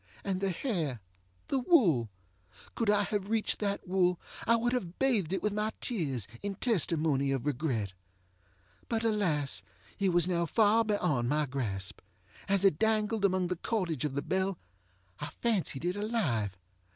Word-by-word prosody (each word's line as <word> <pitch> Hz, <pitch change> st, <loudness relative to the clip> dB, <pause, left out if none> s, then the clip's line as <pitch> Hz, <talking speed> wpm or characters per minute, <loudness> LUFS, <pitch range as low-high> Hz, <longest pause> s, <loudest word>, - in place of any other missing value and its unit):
And 190 Hz, -1 st, -2 dB
the 195 Hz, -, +1 dB
hairŌĆöthe 130 Hz, -, -4 dB
wool! 170 Hz, -, +4 dB, 0.6 s
Could 230 Hz, -3 st, 0 dB
I 205 Hz, 0 st, +4 dB
have 205 Hz, -1 st, -2 dB
reached 220 Hz, -1 st, +1 dB
that 200 Hz, -2 st, -2 dB
wool 180 Hz, -1 st, +2 dB, 0.3 s
I 230 Hz, -, +6 dB
would 240 Hz, +2 st, +1 dB
have 185 Hz, -9 st, -3 dB
bathed 225 Hz, -, +2 dB
it 190 Hz, -, -1 dB
with 210 Hz, -, +1 dB
my 210 Hz, +1 st, 0 dB
tears, 140 Hz, -, -1 dB
in 200 Hz, -1 st, -3 dB
testimony 160 Hz, -, +1 dB
of 135 Hz, -1 st, -1 dB
regret. 125 Hz, -9 st, -1 dB, 1.0 s
But 230 Hz, -1 st, 0 dB
alas! 165 Hz, -, +1 dB, 0.4 s
it 195 Hz, -1 st, +3 dB
was 175 Hz, -1 st, +3 dB
now 170 Hz, -2 st, +1 dB
far 220 Hz, +4 st, +4 dB
beyond 150 Hz, -, +1 dB
my 150 Hz, +1 st, +2 dB
grasp. 110 Hz, -8 st, -3 dB, 0.5 s
As 200 Hz, 0 st, +3 dB
it 175 Hz, -6 st, +4 dB
dangled 220 Hz, -1 st, +1 dB
among 185 Hz, -2 st, +2 dB
the 180 Hz, -, 0 dB
cordage 170 Hz, -, -1 dB
of 145 Hz, -3 st, -2 dB
the 140 Hz, -, -1 dB
bell, 190 Hz, 0 st, 0 dB, 0.6 s
I 145 Hz, -, -4 dB
fancied 180 Hz, -, -1 dB
it 180 Hz, +1 st, 0 dB
alive. 155 Hz, -, -1 dB
185 Hz, 155 wpm, -31 LUFS, 145-210 Hz, 1.0 s, I